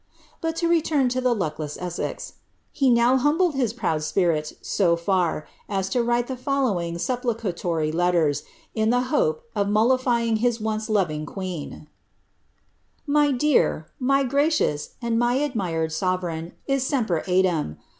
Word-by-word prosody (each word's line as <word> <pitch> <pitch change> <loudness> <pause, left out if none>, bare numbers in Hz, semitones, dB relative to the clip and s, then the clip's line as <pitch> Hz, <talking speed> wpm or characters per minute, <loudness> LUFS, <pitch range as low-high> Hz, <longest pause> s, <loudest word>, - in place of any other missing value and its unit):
But 325 0 -1
to 335 +1 0
return 310 -6 +2
to 255 +1 -1
the 250 -1 +2
luckless 155 -5 -3
Essex. 180 -1 -4 0.4
He 275 -3 +2
now 240 +2 +4
humbled 305 +6 +2
his 255 -5 0
proud 190 -10 -1
spirit 155 -1 0
■o 170 -4 +1
&r, 180 -5 +1 0.2
as 195 -2 -1
to 245 - +1
write 240 0 +1
the 260 - -4
following 240 -11 -1
supplicatory 185 - -1
letters, 170 -3 +2 0.3
in 220 0 +1
the 245 +1 +3
hope 475 -1 +1
of 200 0 +1
mol 220 +5 +4
liiying 235 -3 0
lus 240 -1 +1
once 220 0 -2
loving 155 -8 0
queen: 180 -6 -6 1.2
My 295 -1 +3
dear, 255 - +1
mj 275 +1 +2
gracious, 280 - +1
and 230 -1 +1
my 240 +1 +2
admired 190 - -1
aovereign 175 -1 -2
is 275 -1 0
joiipcr 220 - 0
eadem. 180 - +1
220 Hz, 145 wpm, -24 LUFS, 175-260 Hz, 1.2 s, now